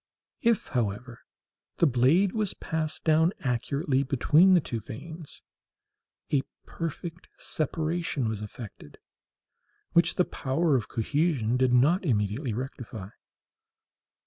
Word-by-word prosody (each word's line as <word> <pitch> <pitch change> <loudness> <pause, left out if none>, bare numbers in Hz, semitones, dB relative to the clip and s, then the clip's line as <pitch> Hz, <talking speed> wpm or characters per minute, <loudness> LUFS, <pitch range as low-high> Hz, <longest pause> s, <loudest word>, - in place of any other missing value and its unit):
If, 230 -3 +2
however, 120 0 -2 0.6
the - - +4
blade 145 +9 +4
was 210 -2 -1
passed 155 -1 -3
down 160 +3 +4
accurately 135 +2 0
between 150 +7 +5
the - - +6
two 120 -7 -4
veins, 155 +9 -8 0.9
a 140 -3 +3 0.2
perfect 165 +1 -6
separation 155 -3 -1
was 110 -2 -3
effected, 105 -7 -9 1.0
which 170 - +4
the 180 - +3
power 140 +3 0
of 115 -6 0
cohesion 130 -1 0
did 130 0 +3
not 145 +10 +4
immediately 115 - 0
rectify. 115 -4 -6
140 Hz, 110 wpm, -28 LUFS, 120-165 Hz, 1.0 s, the